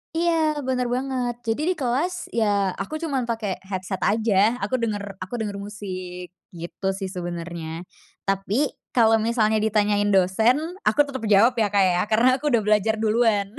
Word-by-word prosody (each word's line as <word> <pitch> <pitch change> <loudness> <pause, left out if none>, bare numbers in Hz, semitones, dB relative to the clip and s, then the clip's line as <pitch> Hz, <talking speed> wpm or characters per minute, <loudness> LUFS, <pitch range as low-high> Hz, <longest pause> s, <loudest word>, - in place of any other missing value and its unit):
Iya 340 +1 +2 0.4
benar 250 -1 0
banget, 255 -2 -2
jadi 225 +6 0
di - - +3
kelas 275 +8 0 0.2
ya 225 - +3 0.4
aku 195 - -6
cuman 275 -6 -1
pake 225 -2 -2 0.2
headset 190 0 -4
aja, 220 0 0 0.3
aku 260 - 0
denger 210 -3 -2 0.2
aku 185 - -11
denger 205 -2 -3
musik, 185 -3 -7 0.3
gitu 170 +3 -6
sih 195 -2 -4
sebenernya, 170 -1 -5 0.4
tapi 195 +1 -1 0.4
kalo 225 -2 +5
misalnya 220 -2 +2
ditanyain 210 -1 +1
dosen 190 +6 +3 0.3
aku - - +2
tetep 260 -4 -6
jawab 220 +5 +6
ya, 215 - +3
Kak, 200 -1 +4
ya 175 - +1
karena 230 +4 +5
aku - - -9
udah 240 -6 +3
belajar 210 +1 +2
duluan. 220 -2 +2
215 Hz, 160 wpm, -23 LUFS, 195-240 Hz, 0.4 s, jawab